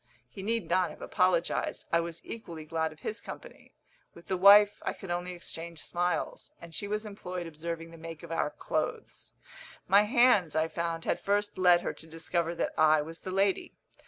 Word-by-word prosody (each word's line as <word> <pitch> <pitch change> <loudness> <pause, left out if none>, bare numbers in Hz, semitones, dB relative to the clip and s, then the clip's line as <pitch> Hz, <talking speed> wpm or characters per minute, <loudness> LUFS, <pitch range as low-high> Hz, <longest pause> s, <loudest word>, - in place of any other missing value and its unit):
He 195 - -9
need 225 +3 -1
not 180 +1 +2
have - - -10
apologised; - - +1
I 170 - +5
was 170 0 -5
equally 170 -9 -7
glad 160 0 -1
of 155 - -16
his 215 - -4
company. - - -11 0.4
With 170 - -15
the 190 - +1
wife 205 +2 +7
I - - -1
could 190 -3 -8
only 175 +1 -2
exchange 170 -1 -7
smiles, 175 +1 -2
and 170 -1 -12
she 205 - -3
was 210 +1 -2
employed 185 -4 -6
observing 165 +1 -6
the 165 - -12
make 165 -1 -8
of - - -9
our 165 - 0
clothes. 300 - -4 0.5
My 200 +2 +7
hands, 210 - +4
I 160 +1 +2
found, 165 0 -3
had - - 0
first 205 +1 0
led 175 -1 +6
her - - -3
to 160 - -11
discover 165 +1 -2
that - - -1
I 155 -1 +5
was 165 +2 -9
the - - -7
lady. 195 +1 0
175 Hz, 190 wpm, -30 LUFS, 165-200 Hz, 0.5 s, wife